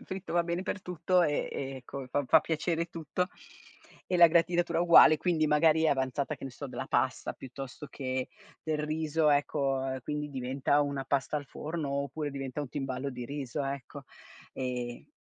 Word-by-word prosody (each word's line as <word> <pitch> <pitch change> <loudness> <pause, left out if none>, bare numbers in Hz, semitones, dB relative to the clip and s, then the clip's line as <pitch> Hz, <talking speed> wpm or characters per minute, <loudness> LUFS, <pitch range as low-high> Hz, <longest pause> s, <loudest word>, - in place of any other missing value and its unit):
il - - -13
fritto 190 -1 -6
va 170 0 +3
bene 170 +2 -2
per 205 - -4
tutto 180 +1 +1
e, 145 -3 0
ehm, 135 -1 -4
ecco, 130 +1 -7
fa 145 -1 0
fa 160 +4 +6
piacere 165 +1 -1
tutto 170 +2 -3 0.8
e 180 - 0
la 170 - +10
gratinatura 170 0 +2
uguale. 170 -2 +8
Quindi 160 -1 +1
magari 155 +1 +4
è - - +5
avanzata, 135 +1 0
che - - -9
ne 135 - -5
so, 140 +3 -7
della 130 0 -5
pasta, 125 -2 0
piuttosto 135 +2 -8
che 130 -2 -3 0.3
del 155 -1 -1
riso, 155 0 +1
ecco, 140 -2 +1
e 130 - -5
quindi 150 +2 -3
diventa 135 +2 0
una 140 -1 -3
pasta 140 +2 0
al 145 - -10
forno 155 -1 -4
oppure 140 +2 -2
diventa 135 0 -4
un 145 - -4
timballo 135 0 -3
di 125 -2 -6
riso 140 +1 -4
ecco, 140 +1 -5 0.5
ehm 125 -2 -4
145 Hz, 180 wpm, -30 LUFS, 135-160 Hz, 0.8 s, la